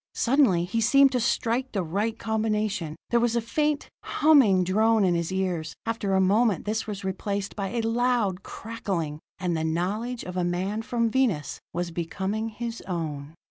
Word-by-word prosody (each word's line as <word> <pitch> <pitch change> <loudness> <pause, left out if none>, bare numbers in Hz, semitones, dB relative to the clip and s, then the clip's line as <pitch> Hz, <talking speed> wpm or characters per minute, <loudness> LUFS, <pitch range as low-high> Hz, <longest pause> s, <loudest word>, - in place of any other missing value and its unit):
Suddenly 235 -10 +3
he 225 +6 -1
seemed 275 +4 +5
to 250 - +1
strike 245 +2 0
the 195 -4 0
right 205 +7 -1
combination. 215 -7 -1 0.2
There 235 - +4
was 235 0 +1
a - - +3
faint, 295 +6 -1
humming 270 -12 +4
drone 215 +4 +3
in 180 -2 +3
his 170 +1 -1
ears; 180 -5 -2
after 225 -4 -1
a - - +4
moment 205 +1 +3
this 215 +1 -2
was 200 -2 -5
replaced 200 +1 -3
by 200 -2 -2
a 235 +3 -1
loud 225 -4 +1
crackling 190 -11 -4 0.2
and 180 -2 -1
the 160 - -1
knowledge 200 +10 -2
of 180 - -6
the 180 0 -1
man 185 +5 -1
from 230 0 0
Venus 220 - 0
was 175 0 -3
becoming 190 +6 -3
his 230 +1 -5
own. 155 -4 -4
210 Hz, 175 wpm, -26 LUFS, 180-230 Hz, 0.2 s, seemed